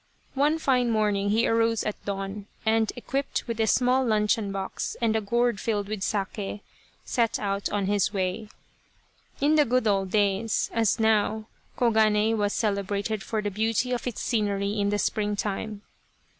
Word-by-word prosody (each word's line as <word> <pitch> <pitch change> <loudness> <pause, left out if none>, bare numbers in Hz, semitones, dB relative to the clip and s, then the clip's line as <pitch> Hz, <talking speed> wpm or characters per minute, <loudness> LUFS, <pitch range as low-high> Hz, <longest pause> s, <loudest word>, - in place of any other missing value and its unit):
One 290 +4 +2
fine 255 -6 +2
morning 210 -2 +1
he 225 +3 +2
arose 225 -1 +2
at 210 - -4
dawn, 195 +1 -4 0.2
and, 220 0 +2
equipped 270 +3 -3
with 230 -1 -4
a 220 - +2
small 250 +4 +3
luncheon 215 -2 +1
box 195 -1 -4
and 225 -2 +1
a 220 - +1
gourd 235 +1 +1
filled 205 -2 -1
with 210 -1 -4
sake, 200 0 -3 0.4
set 230 -2 +1
out 200 -1 -2
on 205 -1 -1
his 205 0 +1
way. 195 +2 -2 0.9
In 300 +2 +3
the 300 - +6
good 250 +1 +1
old 195 -2 +1
days, 205 +2 +1
as 225 -1 +2
now, 220 0 +2 0.3
Koganei 220 -2 +3
was 205 -2 0
cele 205 -3 0
brated 205 +2 -2
for 215 0 -3
the 205 - -2
beauty 225 +4 0
of 245 0 -2
its 240 - -4
scenery 205 -2 0
in 200 0 +1
the 205 - +1
springtime. 205 0 -2
215 Hz, 165 wpm, -26 LUFS, 200-230 Hz, 0.9 s, the